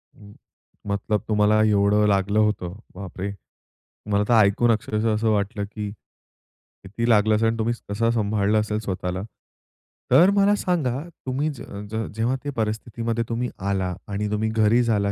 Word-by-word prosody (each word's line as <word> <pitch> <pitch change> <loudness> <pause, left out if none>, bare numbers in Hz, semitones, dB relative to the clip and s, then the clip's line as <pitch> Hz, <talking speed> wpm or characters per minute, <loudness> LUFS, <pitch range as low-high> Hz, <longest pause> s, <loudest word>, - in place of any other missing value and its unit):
हं, 105 0 -15 0.5
मतलब 100 +1 -1
तुम्हाला 105 0 +3
एवढं 105 0 +3
लागलं 100 +1 +2
होतं. 105 -5 0 0.2
बापरे! 95 +1 -5 0.8
मला 100 0 +3
तर 120 - +4
ऐकून 115 +4 +2
अक्षरशः 110 0 0
असं 110 +1 +1
वाटलं, 100 +1 -1
की 105 0 -6 0.9
किती 115 +5 -3
लागलं 110 -1 +4
असेल 110 +1 +2
आणि 115 0 0
तुम्ही 115 +2 +1 0.2
कसं 115 +3 +1
सांभाळला 105 -2 +1
असेल 105 0 -1
स्वतःला? 95 -3 -3 0.9
तर 180 +3 +7
मला 205 +1 +4
सांगा, 145 -10 -1 0.3
तुम्ही 135 +4 -1
ज 140 - -8 0.3
ज 110 0 -2
जेव्हा 115 +4 0
त्या 145 - -3
परिस्थितीमध्ये 115 +1 -2
तुम्ही 120 +1 -2 0.2
आला 95 -2 -1
आणि 105 +1 -2
तुम्ही 110 +1 0
घरी 110 +2 +3
झाला, 105 -3 +1
110 Hz, 150 wpm, -23 LUFS, 100-115 Hz, 0.9 s, तर